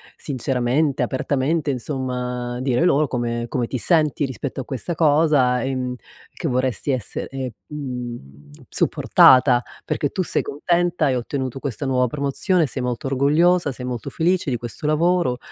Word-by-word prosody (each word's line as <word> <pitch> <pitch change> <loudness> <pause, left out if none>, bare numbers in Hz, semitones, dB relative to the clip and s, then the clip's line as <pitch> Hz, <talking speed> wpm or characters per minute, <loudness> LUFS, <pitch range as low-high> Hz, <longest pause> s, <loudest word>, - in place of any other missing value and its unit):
sinceramente, 135 +1 0
apertamente, 140 +3 0
insomma, 125 -2 -3
dire 130 +4 +1
loro 150 -3 +3
come 120 -2 -2
come 120 -2 -1
ti 130 - -3
senti 155 +2 +2
rispetto 135 +1 -5
a - - -8
questa 140 +6 -4
cosa, 145 -6 +3
ehm, 130 -2 -2 0.4
che 165 - -4
vorresti 130 +2 0
esser 130 -5 -3
ehm 125 - -7 0.3
supportata, 125 -1 +5 0.2
perché 145 - -1
tu 185 - -2
sei - - 0
contenta, 175 +2 0
hai 135 -3 +2
ottenuto 130 +1 -3
questa 140 -1 -4
nuova 125 -1 +2
promozione, 150 - 0
sei 130 - -4
molto 125 +1 -3
orgogliosa, 150 +4 +3
sei 125 0 -7
molto 125 -2 -4
felice 175 -2 0
di 120 - 0
questo 120 +5 -7
lavoro, 165 -4 +2
135 Hz, 145 wpm, -22 LUFS, 125-150 Hz, 0.4 s, supportata